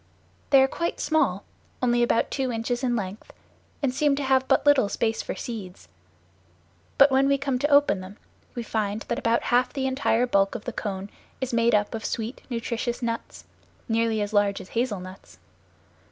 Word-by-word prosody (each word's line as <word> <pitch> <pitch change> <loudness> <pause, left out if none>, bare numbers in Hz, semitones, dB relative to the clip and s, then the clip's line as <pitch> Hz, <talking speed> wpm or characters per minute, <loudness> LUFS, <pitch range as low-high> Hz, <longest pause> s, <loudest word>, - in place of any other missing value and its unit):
They 270 -2 +7
are - - +4
quite 335 +5 -3
small, 275 - +1 0.4
only 240 -1 +2
about 240 -1 +2
two 265 -2 -1
inches 240 +2 -2
in 245 -2 +1
length, 200 -1 -5 0.5
and 260 -2 +1
seem 285 +1 +2
to 285 - -3
have 265 0 +2
but - - +2
little 285 -8 +5
space 225 +2 -1
for - - -5
seeds; 195 - -7 1.1
but 275 0 +7
when 265 +1 +4
we 280 0 +3
come 270 -2 -1
to 290 - +1
open 285 -8 +4
them, 190 +3 -10 0.4
we 240 - -3
find 215 -1 -2
that - - -1
about 230 0 +1
half 250 +1 +3
the 270 -2 -2
entire 260 -3 +1
bulk 195 -5 +2
of - - -6
the 245 - -4
cone 200 -3 -5 0.3
is 260 -2 -3
made 230 -1 +3
up 205 0 0
of 220 -1 -4
sweet, 230 +2 -4
nutritious 235 0 -3
nuts, 230 0 -4 0.4
nearly 225 -1 +1
as 205 +1 -5
large 205 -1 +2
as 190 - -11
hazel 235 -4 -1
nuts. 185 +1 -12
235 Hz, 185 wpm, -25 LUFS, 210-265 Hz, 1.1 s, They